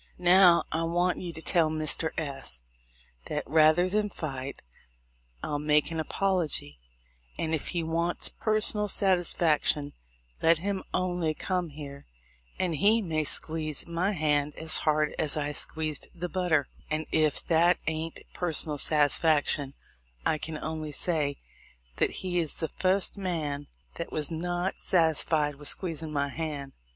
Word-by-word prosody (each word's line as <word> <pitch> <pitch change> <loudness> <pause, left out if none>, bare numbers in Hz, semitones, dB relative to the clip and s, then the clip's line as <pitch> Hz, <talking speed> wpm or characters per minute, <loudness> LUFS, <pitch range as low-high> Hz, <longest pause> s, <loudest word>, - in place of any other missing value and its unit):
Now 180 -1 +6
I 160 - -1
want 175 +2 0
you 175 -2 -5
to 160 0 -6
tell 170 -4 +2
Mr. 155 +1 0
S 135 - -2 0.6
that, 150 - -3
rather 155 +3 +4
than 210 +2 0
fight, 140 -7 -6 0.8
I'll 145 - -2
make 150 +1 +2
any 160 -1 -2
apology; 165 - -1 0.6
and, 160 0 -2
if 155 - -2
he 175 -2 -2
wants 170 +2 -1
personal 215 -1 +2
satisfaction, 170 -6 +2 0.5
let 165 0 +4
him 190 +3 -3
only 175 -4 -1
come 180 -1 -2
here, 140 -1 -10 0.5
and 180 -3 -1
he 215 +7 +3
may 160 -4 -1
squeeze 155 -1 +2
my 175 +4 -1
hand 150 -3 0
as 160 0 +4
hard 150 0 +1
as 155 -1 +1
I 145 -1 -1
squeezed 155 0 -3
the 175 +1 -4
butter, 175 -6 0 0.2
and, 155 +1 -2
if 155 -2 +1
that 170 +2 +3
ain't 160 +1 -4
personal 155 -4 +3
satisfaction, 145 -2 +3 0.5
I 155 - +1
can 160 0 -5
only 155 -1 -5
say 150 -4 0 0.6
that - - +2 0.2
he 175 -1 0
is 160 -3 -2
the 160 - -3
fust 190 +2 +1
man 150 -6 -3 0.3
that 170 - -5
was 155 +1 -2
not 175 +3 -3
sat 165 -3 +3
isfied 150 -3 0
with 145 - -6
squeezin' 160 -4 -3
my 140 -1 -1
hand. 145 -2 -5
160 Hz, 145 wpm, -28 LUFS, 150-175 Hz, 0.8 s, Now